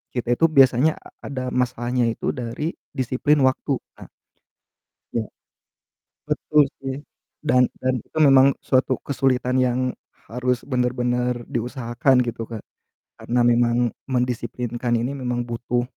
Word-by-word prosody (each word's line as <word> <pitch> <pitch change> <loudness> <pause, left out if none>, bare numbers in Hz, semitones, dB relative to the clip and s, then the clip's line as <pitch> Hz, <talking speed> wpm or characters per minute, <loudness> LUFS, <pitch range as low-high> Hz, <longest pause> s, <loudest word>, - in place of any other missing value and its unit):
kita 120 -1 -1
itu 165 - +3
biasanya 135 -1 +5
a - - -15 0.2
ada 130 -2 -4
masalahnya 125 0 0
itu - - -2
dari 125 +7 -3 0.2
disiplin 135 +3 +1
waktu 135 +2 0 0.2
nak - - -13 1.0
Ya. 115 - 0 1.0
Betul 150 0 +2 0.2
sih 135 -1 -3 0.5
dan 125 -4 +4
dan 130 -2 0
itu 155 - -12
memang 135 -3 +7 0.2
suatu 130 -1 +2
kesulitan 130 -2 0
yang 125 0 +1 0.5
harus 125 +1 -1
benar-benar 125 -1 0
diusahakan 120 +2 +1
gitu, 115 -1 -4
Kak, 115 -2 -5 0.6
karena 125 +1 -1
memang 120 0 +3 0.2
mendisiplinkan 125 -1 -2
ini 125 +3 -2
memang 125 -2 -2
butuh 120 +1 -1
125 Hz, 120 wpm, -23 LUFS, 120-130 Hz, 1.0 s, memang